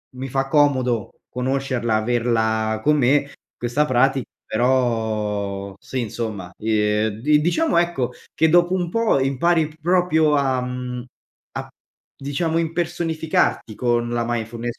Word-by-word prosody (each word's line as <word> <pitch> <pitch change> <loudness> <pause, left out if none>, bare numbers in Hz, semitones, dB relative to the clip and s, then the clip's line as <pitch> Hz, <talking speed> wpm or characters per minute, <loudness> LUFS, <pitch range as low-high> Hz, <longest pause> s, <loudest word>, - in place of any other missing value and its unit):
mi 130 +1 -5
fa 135 +1 -1
comodo 130 -6 +2 0.2
conoscerla, 130 -2 -1
averla 110 -1 +1
con 150 0 +3
me 140 +2 +2 0.3
questa 120 +5 0
prati 135 -1 +2 0.2
Però, 110 -5 0
sì, 130 +4 -4
insomma, 105 -5 -5
ehm, 105 0 +1
di 150 +3 +4
diciamo, 275 - +1
ecco 135 -8 0 0.2
,che 160 - +3
dopo 175 +2 +4
un 175 -2 -1
po' 230 -5 +2
impari 150 +5 +2
p 155 - -17
proprio 160 -3 +3
a 135 -3 +1
mhmm, 125 -1 -5 0.5
a, - - -4 0.5
diciamo, 160 +4 -1
impersonificarti 165 - -1
con 120 0 0
la 120 0 -1
mindfulness, 120 0 -3
130 Hz, 125 wpm, -22 LUFS, 115-155 Hz, 0.5 s, di